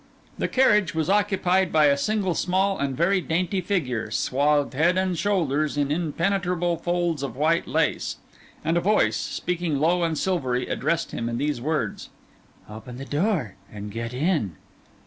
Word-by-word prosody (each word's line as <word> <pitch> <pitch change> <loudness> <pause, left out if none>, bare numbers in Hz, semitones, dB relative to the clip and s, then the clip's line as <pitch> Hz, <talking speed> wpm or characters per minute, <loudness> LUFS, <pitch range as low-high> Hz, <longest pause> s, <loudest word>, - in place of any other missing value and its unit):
The - - +1
carriage 210 -9 +3
was 160 +2 0
occupied 190 -3 +2
by 155 -1 +5
a 140 -1 +5
single 190 +4 0
small 190 +3 0
and 140 -2 -2
very 185 +4 +2
dainty 180 +3 -1
figure, 160 - -1
swathed 145 +1 +1
head 170 +7 +2
and 185 -1 +1
shoulders 155 -6 0
in 145 -1 0
impenetrable 175 +2 0
folds 175 -2 -1
of 135 -4 -4
white 160 +5 +1
lace; - - 0 0.5
and 165 +2 +2
a - - +2
voice, 210 +4 +2
speaking 175 -4 -2
low 170 +4 +2
and 165 -2 0
silvery, 130 -10 0
addressed 170 0 -1
him 115 0 -3
in 115 - -2
these 145 -3 -1
words— 155 +4 -2 0.6
'Open 110 +3 -9
the 135 - -7
door 150 - 0 0.2
and 105 0 -7
get 115 +2 -4
in. 130 - 0
165 Hz, 160 wpm, -24 LUFS, 140-185 Hz, 0.6 s, by